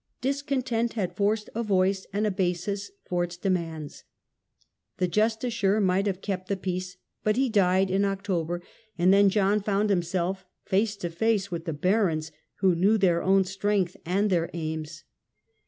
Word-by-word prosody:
Discontent 260 -4 -1
had 185 -6 -2
forced 210 +2 0
a 230 - -2
voice 195 -2 +1
and 205 +2 0
a 210 - +1
basis 190 +1 -2 0.2
for 175 -1 0
its 175 0 -5
demands. 165 -5 -3 0.9
The 180 - +1
jus 220 +5 +2
ticiar 220 -4 0
might 195 0 +2
have 190 -1 -3
kept 185 -2 -3
the 200 - 0
peace, 185 -1 -4 0.3
but 215 0 +2
he 260 +1 +2
died 190 -3 +3
in 195 +1 +2
October, 180 -4 -2 0.3
and 180 +2 +4
then 200 0 +6
John 205 +1 +2
found 205 +1 +1
himself 185 +1 -1 0.2
face 205 +2 +1
to 175 -4 -5
face 200 +1 0
with 170 -1 -4
the 165 - -2
barons, 165 -2 +1 0.3
who 190 -2 +4
knew 195 +6 +3
their 175 -4 +3
own 195 +1 +4
strength 190 -1 -1
and 195 +4 +1
their 170 -2 +1
aims. 155 -1 -5
190 Hz, 165 wpm, -27 LUFS, 175-210 Hz, 0.9 s, then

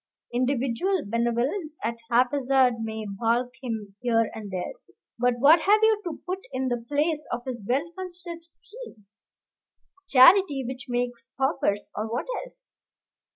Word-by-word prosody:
Individual 265 +8 0
benevolence 240 - -1
at 230 - 0 0.2
haphazard 255 0 +3
may 220 -1 -4
balk 235 +5 0
him 220 -6 -5
here 230 -3 +2
and 215 -2 -7
there, 185 - -4 0.5
but 245 0 +2
what 300 +6 +6
have 415 +2 +5
you 440 -1 +4
to 340 -4 -5
put 370 +1 -3
in 260 0 -1
the 240 -1 -2
place 300 +1 0
of 240 0 -3
his 245 -5 -5
well 275 +6 +1
considered 350 -2 -8
scheme? 340 - -13 1.0
Charity 285 0 +6
which 255 0 -7
makes 245 -1 -2
paupers? 265 -7 0
or 220 +1 -3
what 240 - -2 0.2
else? - - -13
255 Hz, 140 wpm, -26 LUFS, 235-320 Hz, 1.0 s, what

